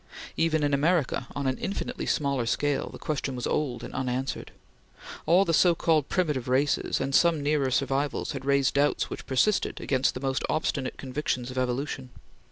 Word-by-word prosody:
Even 160 -2 +1
in 145 -1 +1
America, 145 -3 +1
on 140 - -2
an 130 0 0
infinitely 200 - -4
smaller 140 -5 0
scale, 145 +3 0
the - - -10
question 140 -3 -3
was 125 - -4
old 135 -5 -1
and - - -8
unanswered. 130 0 -3 0.8
All 180 +5 +5
the 165 - 0
so 175 +1 +5
called 155 -4 +1
primitive 150 -9 0
races, 135 +3 +1
and 135 +1 -2
some 165 -1 +4
nearer 145 -2 +1
survivals, 135 +2 0
had 135 -3 -5
raised 140 -1 +2
doubts 145 +1 +1
which - - -7
persisted 190 +11 +1
against 130 -1 +1
the - - -4
most 135 0 -1
obstinate 140 -4 -1
convictions 130 -2 -3
of 130 - -8
evolution. 130 +1 -2
140 Hz, 175 wpm, -27 LUFS, 130-150 Hz, 0.8 s, All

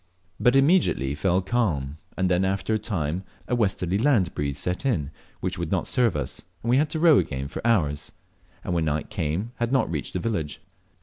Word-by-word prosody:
But 125 +1 +4
it - - +7
immediately 135 - +3
fell 90 +5 +1
calm, 80 - 0 0.2
and 95 - +2
then 90 +1 +2
after 95 +2 0
a 110 - +1
time 90 -4 -2 0.2
a - - -2
westerly 100 -5 +1
land 115 - +3
breeze 70 -2 -2
set 90 - -1
in, 85 - 0 0.3
which - - -2
would - - -2
not - - +1
serve 120 -7 +2
us, 70 -4 -3 0.2
and 115 - 0
we 125 - +5
had 150 +2 +2
to 160 - -2
row 160 -3 +6
again 70 -1 -3
for - - -6
hours, 75 -11 +1 0.5
and - - -2
when 85 -2 +1
night 75 +3 -2
came 95 +3 -2
had 120 0 -1
not 130 - +2
reached 75 -4 -3
the 90 - -1
village. 85 -8 -2
95 Hz, 205 wpm, -25 LUFS, 75-120 Hz, 0.5 s, it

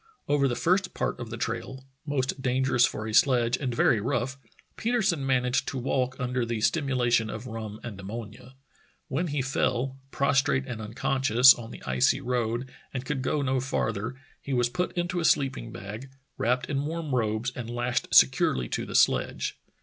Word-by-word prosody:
Over 145 -1 +3
the 120 - -1
first 185 +5 +1
part - - -2
of 120 -2 -6
the 120 - -6
trail 125 +4 -4
— 135 - -47
most 135 -1 -1
dangerous 130 -1 +3
for 110 - -5
a 110 - -4
sledge 120 -1 +4
and 130 -4 -2
very 115 -2 +3
rough 125 +2 -1 0.2
— - - -31
Petersen 215 - 0
managed 130 -1 +1
to 135 - -3
walk 130 0 -1
under 125 -1 -1
the 115 0 -2
stimula 130 0 +1
tion 115 -2 +3
of 110 +3 -6
rum 110 -3 -6
and 110 -5 -7
ammonia. 110 +5 -8 0.5
When 160 +7 -1
he 145 -3 -1
fell, 130 0 -1
prostrate 140 -1 +2
and 125 -4 -6
unconscious, 125 +3 +5
on 115 -2 -9
the - - -10
icy 130 +2 +2
road 120 0 -2 0.2
and 130 -1 -5
could 135 -1 -2
go 145 +2 0
no 130 -1 +1
farther, 115 -2 -2 0.3
he 140 - -4
was 120 -1 +2
put 180 +8 -2
into 175 0 -1
a - - -1
sleeping 135 - +1
bag, 105 +7 -8 0.3
wrapped 125 +2 0
in 140 -1 -2
warm 160 -2 -3
robes, 110 0 0
and 120 -2 -6
lashed 120 +1 -1
securely 60 -2 +4
to - - -3
the - - -6
sledge. - - +2
125 Hz, 185 wpm, -27 LUFS, 115-135 Hz, 0.5 s, unconscious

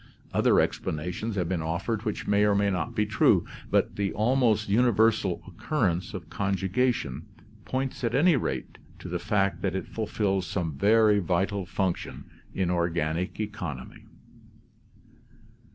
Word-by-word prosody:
Other - - +4
ex - - +1
planations 90 +8 -3
have 90 -4 0
been 90 -2 -1
offered 95 +7 -2
which 105 - -3
may 100 0 +3
or 105 -1 +3
may 100 0 +2
not 95 +6 -2
be 105 -1 +2
true, 105 -2 +3 0.2
but - - +1
the 100 -1 0
almost 110 -1 +2
universal 110 -3 +2
occurrence 95 - -1
of 85 -4 -7
conjugation 95 - -1 0.4
points 130 0 -3
at 115 0 0
any 160 +4 +5
rate 65 - -3 0.2
to - - -9
the - - -3
fact 100 -2 0
that 95 -2 -1
it 95 - -2
fulfils 100 -4 -1
some 80 -2 -2
very 105 +5 +4
vital 95 +1 -1
function 95 -2 -2 0.3
in 90 -2 -1
organic 85 0 -1
econ 105 - -4
omy. - - -16
100 Hz, 145 wpm, -27 LUFS, 90-110 Hz, 0.4 s, any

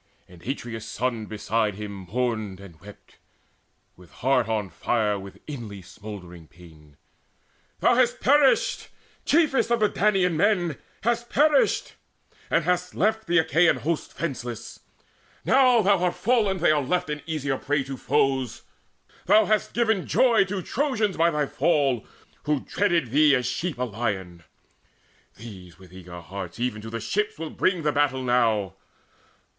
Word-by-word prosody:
And 90 -2 -16
Atreus' 115 -2 -5
son 115 -2 -3
beside 110 -1 -1
him 105 0 -6 0.2
mourned 110 -6 -2
and 90 -5 -14
wept 105 +1 -15 0.8
With 90 -1 -17
heart 125 -3 0
on 105 -5 -2
fire 105 +2 0
with 95 0 -11
inly 110 -10 -8
smouldering 90 -5 -10
pain: 75 -4 -18 0.8
"Thou - - +4
hast 245 0 +2
perished, 295 - +3 0.4
chiefest 300 -6 +2
of 235 0 +2
the 215 - +4
Danaan 195 -5 +2
men, 175 -3 +1 0.3
Hast 235 +1 0
perished, 295 -1 +2 0.6
and 170 - +2
hast 180 +2 -1
left 220 +2 0
the 175 - +2
Achaean 165 +2 +4
host 165 0 -3
Fenceless! 125 -7 -5 0.7
Now 255 -4 +5
thou 195 -1 +3
art 180 - +1
fallen, 215 -5 +1
are - - -8
they 160 - +4
left 150 +3 0
An 150 0 -4
easier 145 -4 -2
prey 145 -1 0
to 135 0 -6
foes. 135 -2 0 0.6
Thou 215 - +6
hast 215 -1 0
given 220 -5 +1
joy 230 -6 +4
To 195 -1 -4
Trojans 225 - -1
by 165 +1 +3
thy 150 -2 0
fall, 140 -6 +1 0.4
who 150 -2 0
dreaded 170 - 0
thee 150 +1 +5
As 125 -1 -1
sheep 170 +2 -3
a 125 - -1
lion. 100 -7 -4 1.0
These 95 -7 -11
with 90 -1 -17
eager 90 -1 -10
hearts 95 +7 -8
Even 120 -3 -2
to 110 - -8
the 115 +1 -4
ships 210 - -2
will 160 0 -6
bring 185 -3 0
the 150 - +2
battle 140 -3 +1
now. 115 -6 +1
140 Hz, 150 wpm, -25 LUFS, -, 1.0 s, Thou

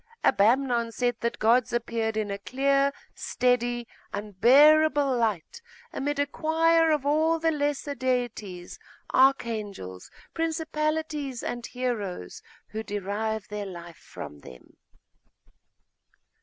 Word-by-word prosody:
Abamnon 235 +2 +3
said 245 0 -1
that 235 0 -2
gods 235 +2 +3
appeared 230 -2 -1
in 210 -2 -1
a 200 - -4
clear, 275 +5 +1 0.2
steady, 245 -1 0 0.2
unbearable 275 +8 +4
light, 220 - -2 0.3
amid 290 +1 -2
a 285 - +2
choir 325 +2 +2
of 300 -3 +1
all 315 +3 +2
the 325 0 +1
lesser 290 -1 -1
deities, 240 -8 -3 0.3
archangels, 215 - +1 0.2
principalities, 310 -4 -2
and 240 -1 -4
heroes, 215 - -4 0.3
who 215 +1 -4
derive 205 +1 -3
their 210 -1 -4
life 170 -2 -9
from 75 - -10
them. 65 -3 -15
245 Hz, 105 wpm, -27 LUFS, 215-290 Hz, 0.3 s, unbearable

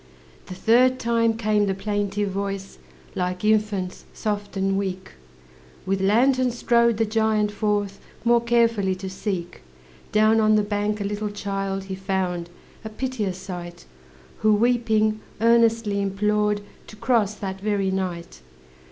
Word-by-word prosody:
The 185 - -7
third 250 +6 +4
time 230 -2 +1
came 215 -2 +1
the 195 - 0
plaintive 205 0 -2
voice, 195 0 -4 0.3
Like 180 +1 -2
infant's, 210 -4 0
soft 205 -1 -3
and 195 0 +1
weak; 190 -1 -3 0.7
With 190 0 0
lantern 250 +6 +3
strode 235 -1 +2
the 225 - +2
giant 215 -1 +1
forth, 205 -1 -1 0.3
More 235 0 +4
carefully 230 -5 +2
to 190 +1 -7
seek. 190 -3 -4 0.5
Down 215 +1 +4
on 215 0 +4
the 210 - +3
bank 205 0 -1
a - - 0
little 205 +1 -3
child 195 -1 -3
He 190 0 -6
found, 190 -3 -2 0.3
a 220 - -5
piteous 215 -5 -3
sight, 175 -2 -8 0.5
Who 215 -1 +4
weeping, 220 -2 +2 0.2
earnestly 230 -2 +3
implored 210 +1 0 0.3
To - - -11
cross 215 -2 +1
that 190 -2 -6
very 200 -2 0
night. 175 - -4
205 Hz, 135 wpm, -24 LUFS, 195-220 Hz, 0.7 s, third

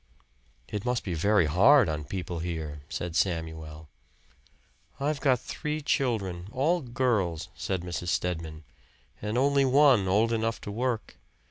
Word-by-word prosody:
"It 105 -2 -4
must 125 -1 -1
be 90 - -3
very 100 +2 +3
hard 110 - +5
on 75 -2 -3
people 90 0 -4
here," 80 -3 -4
said 85 -2 -4
Samuel. 80 -3 -2 1.1
"I've 145 +1 -1
got 130 -4 +3
three 150 +4 -4
children 110 - -1
all 160 +8 +1
girls," 110 - -1
said 95 -1 -3
Mrs. 90 0 -5
Stedman, 80 -3 -2 0.6
"and 105 +3 -2
only 140 +1 +3
one 135 -6 +5
old 110 +5 +2
enough 115 0 -1
to 105 - -6
work. 120 +1 -2
100 Hz, 135 wpm, -28 LUFS, 85-125 Hz, 1.1 s, hard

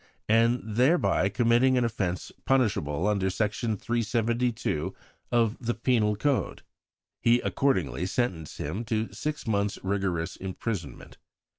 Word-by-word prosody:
and 115 +2 +3
thereby 120 - +2
committing 120 +3 +3
an 125 - +3
offence 95 -6 -2
punishable 100 - +1
under 100 -2 +1
Section 105 +2 -1
372 115 -5 -1 0.4
of 115 -2 +2
the 120 -1 -2
Penal 115 -3 +2
Code. 140 +5 -1 0.6
He 120 +1 +4
accordingly 95 - 0
sentenced 95 - -2
him 85 +11 -3
to 110 0 -2
six 150 0 -4
months' 100 -2 0
rigorous 95 -4 -1
imprisonment. 95 +1 -5
110 Hz, 115 wpm, -27 LUFS, 95-120 Hz, 0.6 s, He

